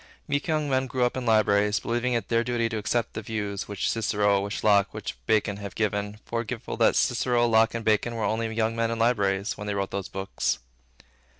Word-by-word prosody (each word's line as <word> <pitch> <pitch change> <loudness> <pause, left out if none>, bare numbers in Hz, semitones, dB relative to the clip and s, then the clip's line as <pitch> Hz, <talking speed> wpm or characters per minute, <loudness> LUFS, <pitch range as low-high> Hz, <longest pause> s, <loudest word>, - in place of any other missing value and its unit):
Meek 145 +1 -1
young 155 -2 0
men 130 -1 +1
grow 125 -1 +1
up 125 - -1
in 130 -2 -3
libraries, 105 -1 +3
believing 120 +1 -1
it 115 -4 -1
their 115 0 +2
duty 120 -1 0
to 110 -1 -3
accept 110 +3 -1
the - - -4
views, 105 -2 -4
which 100 -2 -2
Cicero, 105 -3 +2
which 100 +1 -4
Locke, 100 -2 +3
which - - -5
Bacon, 105 -2 +2
have 100 -2 -7
given, 105 -1 -1
forgetful 115 +1 -4
that 115 - +4
Cicero, 120 -1 +2
Locke, 110 0 +3
and 115 - -4
Bacon 110 +2 +2
were 115 - -2
only 110 +1 -1
young 110 0 0
men 115 0 0
in 115 - -2
libraries, 105 -3 +1
when 105 - -5
they 100 - -1
wrote 100 -1 -2
these 100 -1 -3
books. 95 0 -2
110 Hz, 210 wpm, -26 LUFS, 100-120 Hz, -, that